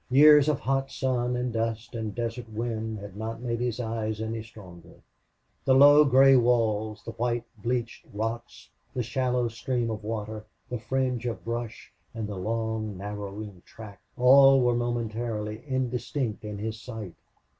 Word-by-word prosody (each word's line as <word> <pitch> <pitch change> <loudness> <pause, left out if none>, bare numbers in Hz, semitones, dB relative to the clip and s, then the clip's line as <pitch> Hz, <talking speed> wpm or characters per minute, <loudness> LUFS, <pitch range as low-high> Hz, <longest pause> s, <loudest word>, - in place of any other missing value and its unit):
Years 150 +2 +7
of 150 - +1
hot 135 0 0
sun 125 -2 -1
and 125 -1 -2
dust 115 0 -2
and 110 -3 -4
desert 115 0 -4
wind 110 0 -3
had 100 -1 -9
not 110 +2 -5
made 115 -1 -3
his 120 -1 -2
eyes 110 -2 -3
any 110 0 -3
stronger. 95 -6 -13 0.7
The 130 - +4
low 145 +2 +8
gray 135 0 +6
walls, 110 -3 +1
the - - -5
white 120 0 -1 0.2
bleached 120 0 -3
rocks, 115 +3 -5 0.2
the 125 - 0
shallow 125 0 0
stream 115 0 -2
of 110 -1 -5
water, 110 0 -4 0.3
the 125 - -3
fringe 125 0 -1
of 115 - -5
brush, 115 -1 -5 0.2
and 110 -2 -3
the 105 - -5
long 110 +1 -2
narrowing 100 -1 -7
track 105 -4 -12 0.2
all 135 +1 +7
were 120 0 +3
momentarily 115 -2 -3
indistinct 125 -2 -2
in 105 -1 -5
his 110 +2 -5
sight. 110 -7 -7
115 Hz, 155 wpm, -27 LUFS, 110-125 Hz, 0.7 s, low